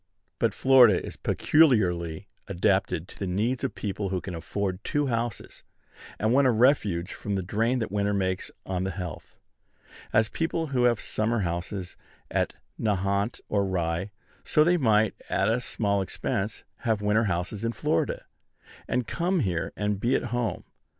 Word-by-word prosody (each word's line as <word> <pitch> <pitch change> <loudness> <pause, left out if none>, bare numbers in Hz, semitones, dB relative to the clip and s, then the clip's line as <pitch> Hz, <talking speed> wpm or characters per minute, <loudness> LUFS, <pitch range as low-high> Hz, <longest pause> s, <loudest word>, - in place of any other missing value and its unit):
But - - +1
Florida 125 -8 +6
is - - -7
peculiarly 95 - +2 0.2
adapted 95 -3 +1
to - - -13
the 95 - -2
needs 110 +8 0
of 100 - -2
people 100 0 -3
who 95 -1 -1
can 90 - -7
afford 95 +3 -3
two 145 0 0
houses, 115 -5 -3 0.5
and 110 +2 +1
want 140 0 +5
a - - +5
refuge 110 -7 +2
from 100 -1 -3
the 95 - -1
drain 115 +7 +1
that 110 -6 -3
winter 100 0 +1
makes 95 -1 -1 0.2
on 95 -1 -2
the 95 - -1
health. 90 -3 -7 0.7
As 110 0 +4
people 165 +5 -1
now 125 -3 +2
have 120 -3 +3
summer 110 +1 -1
houses 90 +1 -4 0.3
at - - 0 0.2
Nahant 100 +1 0
or 100 -1 +1
Rye, 90 0 -1 0.3
so 150 - +4
they 175 +3 +4
might, 110 - +3 0.2
at 95 - +1
a 115 +3 +1
small 100 -4 0
expense, 95 +2 -3
have 110 -5 -1
winter 105 +2 +3
houses 95 +3 -2
in 115 - 0
Florida, - - -1 0.6
and 125 0 0
come 175 - 0
here 90 -7 -1
and 105 -1 -1
be 120 +5 +2
at - - 0
home. 120 -6 -1
105 Hz, 165 wpm, -27 LUFS, 95-120 Hz, 0.7 s, Florida